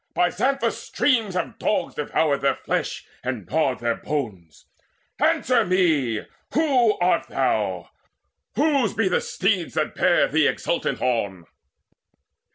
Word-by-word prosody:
By 175 -1 +2
Xanthus' 275 +1 0
streams 225 -9 +1
have 180 - -3
dogs 210 - 0
devoured 145 -1 0
their 140 - +2
flesh - - -3 0.2
And 125 -6 -3
gnawed 135 - 0
their 120 0 +1
bones. 100 - -5 0.6
Answer 245 -2 +3
me, 160 - +1 0.3
who 265 -8 +3
art 180 +1 +1
thou? - - -1 0.6
Whose 280 -7 +2
be 220 -3 +2
the 180 - +1
steeds 190 -3 -1
that - - 0
bear - - +3
thee - - +3
exultant - - -1
on?" 100 -8 -1
175 Hz, 125 wpm, -23 LUFS, -, 0.6 s, Answer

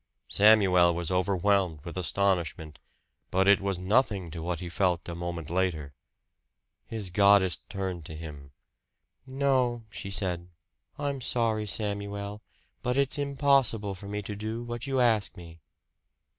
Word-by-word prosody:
Samuel 95 -5 +5
was 85 0 -3
overwhelmed 95 -3 +1
with 85 - -7
astonishment; 90 -4 -1 0.5
but 95 +1 +2
it 100 0 +6
was 100 -2 -1
nothing 95 -2 +1
to 80 - -6
what 85 +1 -3
he 90 - -6
felt 90 -1 0
a 85 - -4
moment 85 -2 -5
later. 85 -6 -1 0.9
His 105 -5 -5
goddess 100 -3 +5
turned 95 -4 -4
to 80 - -8
him. 75 -3 -9 0.8
"No," 130 -3 +1
she 100 - -6
said. 90 -3 -2 0.5
"I'm 140 -2 -3
sorry, 110 -3 0
Samuel, 100 0 -2 0.4
but 125 +1 -1
it's 140 +1 +1
impossible 135 -7 +2
for 100 +1 -10
me 105 +1 -4
to 105 +1 -5
do 110 +3 -4
what 120 +1 -6
you 135 -1 0
ask 115 -4 +2
me." 85 -1 -12
100 Hz, 140 wpm, -28 LUFS, 85-110 Hz, 0.9 s, it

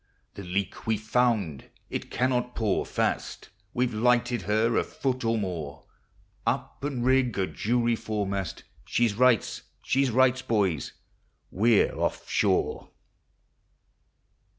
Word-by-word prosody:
The 100 - -8
leak 95 +4 -3
we 110 -1 +2
've - - -12
found, 110 - 0 0.2
it - - -4
cannot 125 -1 0
pour 105 -4 0
fast; - - -2 0.2
We 125 - +1
've 120 - -4
lighted 120 +1 +2
her 110 +2 +2
a - - +3
foot 130 -2 -3
or 115 0 +1
more; 85 -8 -4 0.6
Up - - -2
and 135 -4 -2
rig 130 -4 +3
a 95 - +2
jury 120 +4 0
foremast, 100 -5 -3 0.2
She 120 - +2
rights! 120 +1 +2 0.2
she 135 0 +2
rights, 130 +2 +3
boys! 100 - 0 0.6
we 110 +2 +4
're - - -4
off - - -1
shore. - - 0
115 Hz, 130 wpm, -27 LUFS, 100-125 Hz, 0.6 s, we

